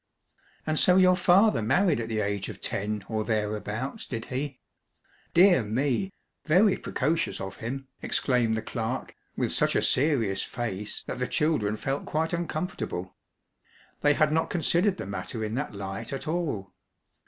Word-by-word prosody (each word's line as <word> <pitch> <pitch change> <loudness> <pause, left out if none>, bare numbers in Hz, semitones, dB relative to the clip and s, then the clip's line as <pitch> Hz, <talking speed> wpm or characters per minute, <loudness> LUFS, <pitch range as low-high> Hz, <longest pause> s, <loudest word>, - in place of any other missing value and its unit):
"And 155 0 +1
so 180 - +5
your 185 -1 +6
father 185 - +4
married 175 - +3
at 115 - -3
the 110 -1 0
age 100 -1 -2
of - - -8
ten 105 0 -1
or 110 -1 -1
thereabouts, 110 - -2
did 115 -2 -4
he? 135 0 -3 0.8
Dear 175 -4 +7
me; 130 - 0 0.3
very 185 +6 +5
precocious 155 +5 -1
of 95 0 -6
him!" 135 +4 -5
exclaimed 120 -4 +1
the 110 - -3
clerk, 115 +3 -3 0.2
with - - 0
such - - +2
a - - +3
serious 125 -9 +2
face 105 -4 -4
that - - -5
the 125 - 0
children 115 -10 +1
felt 135 +5 -3
quite 160 +2 -1
uncomfortable. 165 - -3 0.8
They 145 0 +3
had 155 0 +3
not 160 +1 +1
considered 180 +3 +2
the - - -5
matter 100 +3 -5
in 110 0 -3
that 135 -3 -3
light 100 +3 -5
at 135 +3 -5
all. 150 - -2
130 Hz, 155 wpm, -27 LUFS, 105-160 Hz, 0.8 s, Dear